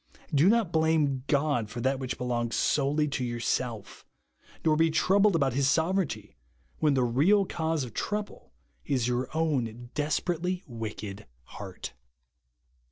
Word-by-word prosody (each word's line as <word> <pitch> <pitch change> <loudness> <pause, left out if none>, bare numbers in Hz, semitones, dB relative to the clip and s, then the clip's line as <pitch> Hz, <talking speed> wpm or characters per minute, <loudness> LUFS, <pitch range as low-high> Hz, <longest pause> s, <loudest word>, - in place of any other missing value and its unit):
Bo 145 +2 +4
not 215 -3 +3
blame 160 -5 +2
God 140 -7 +1
for 120 - -6
that 130 +2 0
which 130 -2 -4
belongs 120 -2 -1
solely 150 +1 +2
to 135 -2 -2
yourself; 120 -2 -3 0.6
nor 155 -1 +4
be 165 +1 +3
troubled 195 +4 +3
about 135 -5 +2
His 135 +1 +2
sovereignty 160 - 0 0.4
when 150 -3 +3
the 130 - +3
real 155 - +3
cause 160 -4 -1
of 120 -4 -8
trouble 210 0 -4 0.3
is 130 -5 0
your 125 +1 -1
own 125 -7 -1
desperately 175 +4 -1
wicked 105 - -6 0.2
heart. - - -8
140 Hz, 135 wpm, -28 LUFS, 120-160 Hz, 0.6 s, Bo